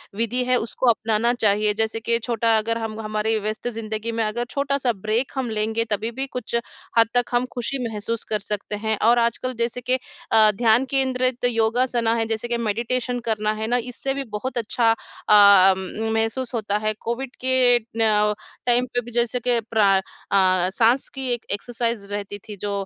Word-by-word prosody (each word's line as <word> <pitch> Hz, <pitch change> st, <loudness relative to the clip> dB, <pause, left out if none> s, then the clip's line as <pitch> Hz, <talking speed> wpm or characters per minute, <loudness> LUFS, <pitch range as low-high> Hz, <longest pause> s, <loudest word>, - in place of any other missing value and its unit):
विधि 230 Hz, +3 st, 0 dB
हैं 250 Hz, 0 st, +2 dB
उसको 240 Hz, +2 st, 0 dB
अपनाना 225 Hz, +1 st, +1 dB
चाहिए, 210 Hz, -2 st, +2 dB
जैसे 220 Hz, +1 st, -1 dB
कि 230 Hz, +1 st, +1 dB
छोटा 230 Hz, -1 st, +1 dB
अगर 230 Hz, +1 st, -1 dB
हम 225 Hz, -1 st, -5 dB
हमारी 215 Hz, +1 st, -1 dB
व्यस्त 215 Hz, +3 st, -4 dB
ज़िंदगी 220 Hz, -1 st, -4 dB
में 230 Hz, 0 st, -1 dB
अगर 225 Hz, +3 st, -2 dB
छोटा-सा 280 Hz, -2 st, 0 dB
ब्रेक 215 Hz, +5 st, -1 dB
हम 260 Hz, -3 st, -2 dB
लेंगे, 220 Hz, +1 st, -1 dB
तभी-भी 225 Hz, +4 st, -3 dB
कुछ 240 Hz, -2 st, -4 dB, 0.4 s
हद 230 Hz, -1 st, +6 dB
तक 245 Hz, 0 st, +3 dB
हम 240 Hz, +1 st, +2 dB
खुशी 245 Hz, +3 st, -2 dB
महसूस 225 Hz, +1 st, -3 dB
कर 215 Hz, -, 0 dB
सकते 205 Hz, +1 st, -4 dB
हैं। 220 Hz, +1 st, -1 dB
और 240 Hz, 0 st, +5 dB
आजकल 235 Hz, +2 st, 0 dB
जैसे 235 Hz, +1 st, -1 dB
के 250 Hz, +1 st, +1 dB, 0.4 s
अ, 220 Hz, -1 st, +6 dB
ध्यान 230 Hz, +4 st, +3 dB
केंद्रित 255 Hz, -2 st, 0 dB
योगासना 235 Hz, 0 st, +1 dB
है, 225 Hz, -1 st, 0 dB
जैसे 225 Hz, +1 st, -2 dB
कि 235 Hz, 0 st, -1 dB
मेडिटेशन 235 Hz, +3 st, -1 dB
करना 215 Hz, -2 st, 0 dB
है 220 Hz, 0 st, -4 dB
ना, 245 Hz, +2 st, +2 dB
इससे 250 Hz, +3 st, -3 dB
भी 275 Hz, 0 st, -3 dB
बहुत 255 Hz, +3 st, -5 dB
अच्छा 230 Hz, 0 st, +2 dB
अ, 200 Hz, -3 st, +5 dB
उम, 215 Hz, +4 st, -4 dB
महसूस 235 Hz, +3 st, -2 dB
होता 210 Hz, -3 st, -1 dB
है 215 Hz, 0 st, -1 dB
कोविड 245 Hz, +2 st, -4 dB
के 255 Hz, -1 st, +4 dB, 0.2 s
न 210 Hz, -2 st, +3 dB, 0.3 s
टाइम 245 Hz, 0 st, +3 dB
पे 245 Hz, -, +1 dB
भी 240 Hz, 0 st, -11 dB
जैसे 240 Hz, +1 st, 0 dB
कि 245 Hz, 0 st, +2 dB
प्रा 205 Hz, -3 st, +4 dB
अ -, -, 0 dB, 0.3 s
अ, 185 Hz, -2 st, +3 dB
साँस 235 Hz, +5 st, +3 dB
की 265 Hz, -1 st, -4 dB
एक 240 Hz, -, -4 dB
एक्सरसाइज़ 230 Hz, +1 st, -2 dB
रहती 205 Hz, 0 st, -4 dB
थी 210 Hz, -, -7 dB
जो 205 Hz, -, -2 dB
230 Hz, 185 wpm, -23 LUFS, 215-245 Hz, 0.4 s, हद